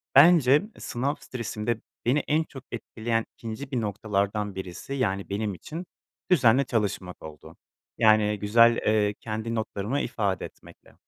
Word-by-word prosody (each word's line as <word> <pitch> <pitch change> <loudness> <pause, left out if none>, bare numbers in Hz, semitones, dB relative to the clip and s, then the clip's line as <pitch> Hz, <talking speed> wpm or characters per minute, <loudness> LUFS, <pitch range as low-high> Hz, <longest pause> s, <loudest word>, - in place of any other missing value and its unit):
bence 145 -2 +7 0.2
sınav 135 +5 -2
stresinde 115 -2 -4 0.2
beni 135 +5 +3
en 155 +2 +2
çok 135 -4 -11
etkileyen 115 -1 -2
2'nci 120 +5 -7
bir 125 -3 0
noktalardan 100 -1 -1
birisi 95 +8 -6
yani 100 -8 -1
benim 105 0 -2
için 160 - -7 0.5
düzenli 130 -4 +5
çalışmak 100 -6 -2
oldu. 75 -1 -11 0.4
Yani 105 -2 +4
güzel, 115 +3 +5
ııı, 105 -1 +3
kendi 110 +1 -4
notlarımı 110 +4 -2
ifade 100 -6 -1
etmekle. - - -15
110 Hz, 130 wpm, -26 LUFS, 105-125 Hz, 0.5 s, bence